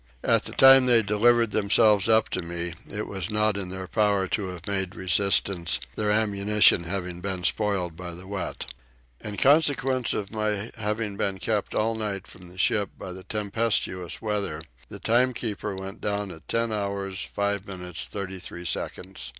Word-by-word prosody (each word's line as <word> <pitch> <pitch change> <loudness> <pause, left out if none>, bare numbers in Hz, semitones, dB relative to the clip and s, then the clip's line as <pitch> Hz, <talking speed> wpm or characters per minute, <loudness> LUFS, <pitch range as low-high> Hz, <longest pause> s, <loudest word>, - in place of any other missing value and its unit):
At - - +2
the - - -3
time 135 -1 +8
they 120 -2 +7
delivered 115 +3 +3
themselves 105 0 +4
up 110 0 +4
to 95 - -2
me 85 0 -4 0.2
it 105 +1 -4
was 95 -2 -2
not 105 -1 +2
in 95 -2 -4
their 95 0 -6
power 100 -1 +1
to 100 -3 -1
have 90 -2 -8
made 95 -1 -2
resistance, 95 -1 +1
their 105 -1 -1
ammunition 105 -3 +4
having 90 -1 -4
been 95 -1 -3
spoiled 95 -3 0
by 85 0 -7
the 90 +2 -11
wet. 95 -1 -4 0.6
In 105 -1 -5
consequence 135 -2 +3
of 100 -2 -4
my 105 0 -2
having 105 -2 -3
been 100 -1 -1
kept 105 +3 -2
all 110 +1 +1
night 105 -3 -3
from 90 -1 -13
the 90 - -15
ship 100 +2 +2
by 90 - -7
the 95 - -9
tempestuous 105 -4 -2
weather 100 -8 -2 0.3
the - - -8
timekeeper 115 -4 0
went 95 +1 -8
down 100 -1 -2
at 80 -1 -13
10 115 0 0
hours 100 -2 -2
5 100 0 -2
minutes 90 -2 -4
36 95 -3 -6
seconds. 90 +5 -4
100 Hz, 165 wpm, -26 LUFS, 95-110 Hz, 0.6 s, time